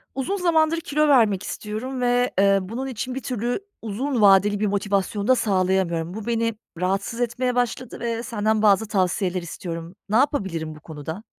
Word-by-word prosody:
Uzun 270 +9 -1
zamandır 330 -3 +2
kilo 300 0 +1
vermek 220 -8 +4
istiyorum 245 +5 -5
ve, 245 0 +2
ııı, 195 -1 +3
bunun 255 +4 -4
için 255 0 -4
bir 270 - -4
türlü 245 - -2 0.2
uzun 235 +4 -2
vadeli 200 0 +5
bir 210 - +1
motivasyon 200 0 -1
da 255 - +6
sağlayamıyorum. 185 -6 0
Bu 215 0 -6
beni 230 -1 0 0.2
rahatsız 195 +6 -1
etmeye 245 +1 0
başladı 245 0 -2
ve 230 0 -2
senden 220 -3 0
bazı 215 +1 +4
tavsiyeler 185 -2 0
istiyorum. 170 0 -7
Ne 210 - +1
yapabilirim 190 - 0
bu - - -13
konuda? 160 +5 -7
215 Hz, 165 wpm, -23 LUFS, 190-245 Hz, 0.2 s, da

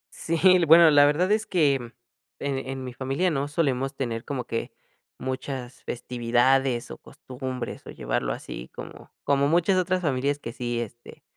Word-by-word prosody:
Sí, 165 0 -2
l 180 -3 +6
bueno 165 0 +8
la 145 0 +7
verdad 175 +7 +2
es 220 0 +1
que 155 -7 +3 0.7
en 140 -1 -2
en 135 0 -6
mi 125 -1 -6
familia 135 +8 -1
no 140 -1 -1
solemos 135 -3 -1
tener 115 -4 -3
como 135 -4 -4
que 115 - -4 0.5
muchas 130 -1 -5
festividades 125 +1 +1
o - - -9
costumbres 130 -1 -7
o - - -8
llevarlo - - -2
así - - -7
como - - -10
como 140 0 +2
muchas 175 +4 +3
otras 185 0 0
familias 140 0 0
que 115 -5 -7
sí, 120 -1 -3
este, 120 +1 -9
135 Hz, 165 wpm, -25 LUFS, 125-155 Hz, 0.7 s, bueno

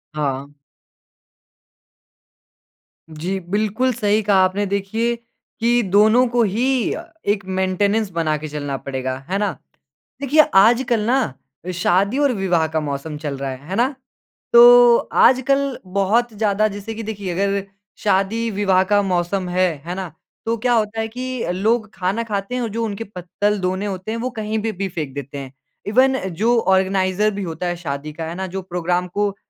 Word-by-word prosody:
हाँ। 140 -1 -3 2.5
जी, 170 +5 -3
बिल्कुल 215 +7 0
सही 215 -2 +1
कहा 200 -1 +3
आपने। 190 +2 0
देखिए 200 +4 -1 0.4
कि 240 +1 +3
दोनों 215 +5 +4
को 240 0 +2
ही 220 +4 0 0.7
एक 200 -1 -6
मेंटेनेंस 190 +3 0
बना 165 -3 0
के 155 +1 -6
चलना 145 -2 -4
पड़ेगा, 130 -1 -4
है 190 - 0
ना? 205 -1 0 0.7
देखिए 285 +3 +5
आजकल 235 +4 +5
ना 255 - +1 0.4
शादी 190 +7 +2
और 285 -2 +3
विवाह 180 -6 +1
का 160 0 -1
मौसम 150 +1 -4
चल 145 -2 -4
रहा 135 0 -3
है, 130 +3 -10
है 190 - -2
ना? 255 +6 +1 0.6
तो 240 0 +9 0.3
आजकल 275 +1 +3
बहुत 200 +5 +1
ज़्यादा 210 0 +1
जैसे 205 +1 -6
कि 225 - -5
देखिए 205 -4 -4
अगर 200 +2 0 0.4
शादी-विवाह 200 -1 +2
का 205 0 +5
मौसम 185 0 -1
है। 185 +1 +2 0.2
है 175 +1 -4
ना? 185 -3 -5 0.3
तो 230 +1 0
क्या 245 +2 +1
होता 220 -1 0
है 220 - -2
कि 255 +2 -4
लोग 215 +3 0
खाना 195 +5 -1
खाते 205 +1 -3
हैं 250 - -1
और 230 - -2
जो 230 +2 -3
उनके 210 0 -4
पत्तल-दोने 190 0 -2
होते 195 +1 -4
हैं 230 - -2
वो 250 +2 -2
कहीं 215 +1 -2
पे 225 - 0
भी 195 -1 -3
फेंक 155 -6 -5
देते 140 0 -6
हैं। 135 -1 -8 0.3
इवन 260 +5 +3 0.2
जो 235 +2 +4
ऑर्गेनाइज़र 190 +1 +2
भी 200 - -3
होता 170 0 -4
है 175 - -1
शादी 150 -2 -5
का। 160 +1 -5
है 165 - -5
ना? 190 +1 -4
जो 190 +1 -5
प्रोग्राम 180 0 -1
को, 200 +2 -1
200 Hz, 165 wpm, -20 LUFS, 180-225 Hz, 2.5 s, तो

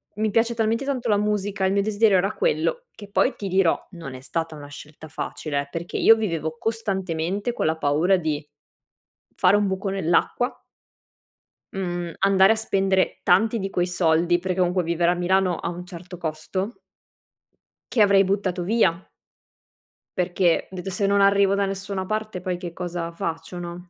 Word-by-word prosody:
mi 215 +1 0
piace 230 +2 +2
talmente 230 +3 0
tanto 255 -4 -2
la 205 - +4
musica, 205 -1 -1
il 190 - +2
mio 200 - +2
desiderio 210 -1 +3
era 195 +4 0
quello - - 0
che 205 -1 -12
poi 255 +5 +2
ti 200 - -5
dirò, 185 -2 +3
non 165 -8 -8
è 130 - -10
stata 165 +3 -3
una 145 -1 -10
scelta 150 +2 -11
facile 150 -1 -3
eh, 140 - -9
perché 170 +1 -4
io 225 - +7
vivevo 165 -7 -3
costantemente 195 -2 -2
con - - -2
la 160 +1 +1
paura 160 +6 +2
di 155 -3 -2 0.9
fare 180 +2 +4
un 205 - +1
buco 190 +1 -2
nell'acqua 190 +6 0 1.2
mhmm, 175 -3 -3
andare 195 0 +5
a - - -3
spendere 195 -3 +1
tanti 215 +6 +3
di 195 -1 -3
quei 175 0 0
soldi- 175 -1 +2
perché 185 +1 -2
comunque 180 0 +2
vivere 170 +1 +1
a - - 0
Milano 180 +1 +2
ha - - -3
un 175 +1 -7
certo 180 0 -9
costo 175 +7 -3 1.2
che 230 - +2
avrei 200 -1 +6
buttato 190 -2 -1
via. 190 -4 +2 1.2
Perché 180 -1 +1
ho - - -9
detto: 185 +1 -5
"Se 195 +2 0
non 200 0 +3
arrivo 200 0 +4
da 200 0 +1
nessuna 195 0 -4
parte 215 -1 -3
poi 180 -1 -3
che 175 -2 -6
cosa 175 -1 -4
faccio", 165 +1 -5
no? 175 +1 -7
185 Hz, 175 wpm, -24 LUFS, 170-200 Hz, 1.2 s, io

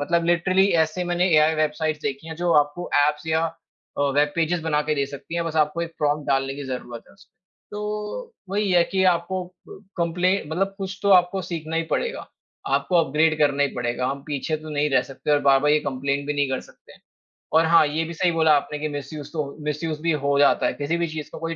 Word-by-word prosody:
मतलब 170 +3 +1
लिटरली 185 +3 +3 0.2
ऐसे 170 +3 -4
मैंने 175 +1 +1
एआई 155 +1 +4
वेबसाइट्स 155 0 -1
देखी 140 +4 -4
हैं 160 - -5
जो 175 0 +1
आपको 145 +5 -8 0.2
एप्स 150 +1 -2
या 160 0 +1 0.6
अ, - - +2
वेब 145 0 +3
पेजेस 170 +1 0
बनाकर 150 -1 0
दे 140 -1 0
सकती 140 +4 -9
हैं 170 0 -1
बस 165 -1 -4
आपको 150 +3 -5
एक 165 -1 -6
प्रॉम्प्ट 150 0 0
डालने 135 0 +1
की 140 0 -7
ज़रूरत 125 -2 -6
है - - -19
उसमें 200 +1 -22 0.4
तो 210 - -5 0.2
वही 205 0 0
है 175 -1 +5
कि, 190 +1 0
आपको 180 +1 +1
अ, 180 +1 -15 0.2
कम्प्ले 175 +1 +1
मतलब 195 +6 -2
कुछ 190 -1 -5
तो 200 - +2
आपको 185 0 +4
सीखना 165 -2 -4
ही 165 - +1
पड़ेगा, 485 +1 -2 0.4
आपको 180 - +1
अपग्रैड 155 +2 +2
करना 145 -1 +2
ही 140 - +2
पड़ेगा। 125 0 -2
हम 140 +1 -3
पीछे 150 +1 -2
तो 155 0 -11
नहीं 150 0 0
रह 130 -2 +3
सकते 135 - -4
और 145 - +5
बार-बार 135 +2 +4
ये 150 - +3
कम्प्लेन 140 +1 -2
भी 145 - 0
नहीं 145 -1 +1
कर 130 - -1
सकते - - -18 0.7
और 165 - +4
हाँ, 165 -1 +5
ये 155 +3 -1
भी 165 +1 -6
सही 175 +1 +1
बोला 160 -2 +4
आपने 150 +1 -4
कि 155 - -2
मिसयूज़ 145 +1 -8
तो 155 -2 -1
हो 140 0 -9
मिसयूज़ 150 +1 -3
भी 165 +1 +1
हो 140 0 +2
जाता 145 - +4
है। - - -1
किसी 145 +4 -2
भी 170 0 0
चीज़ 155 -1 -6
को - - -8
कोई 165 0 -3
160 Hz, 230 wpm, -23 LUFS, 145-175 Hz, 0.7 s, है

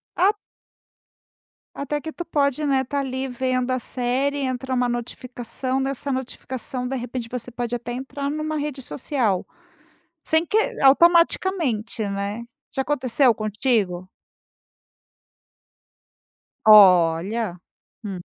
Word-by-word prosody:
Ah 385 +4 +4 1.4
Até 295 +1 -3
que 315 +2 -6
tu 345 - -5
pode, 285 -3 0
né, 270 -2 +2
tá 280 +3 -2
ali, 265 0 -3
vendo 255 0 -1
a 255 - 0
série, 255 +4 -1
entra 260 -1 -2
uma 245 0 +2
notificação, 245 +2 -4
nessa 275 +1 -2
notificação 255 0 -4
de 270 - -3
repente, 245 -1 -5
você 250 0 -5
pode 240 0 -4
até 240 0 -4
entrar 280 +2 -4
numa 310 +1 -3
rede 290 -2 -3
social, 245 - -1 0.8
sem 320 +2 +1
que 425 - +1 0.2
automaticamente, 310 - +3
né. 200 +3 -3 0.3
Já 270 - 0
aconteceu 260 -2 +2
contigo? 210 -4 -1 2.6
Olha, 185 0 +5 0.4
hum. 190 -4 -6
255 Hz, 110 wpm, -23 LUFS, 230-280 Hz, 2.6 s, Olha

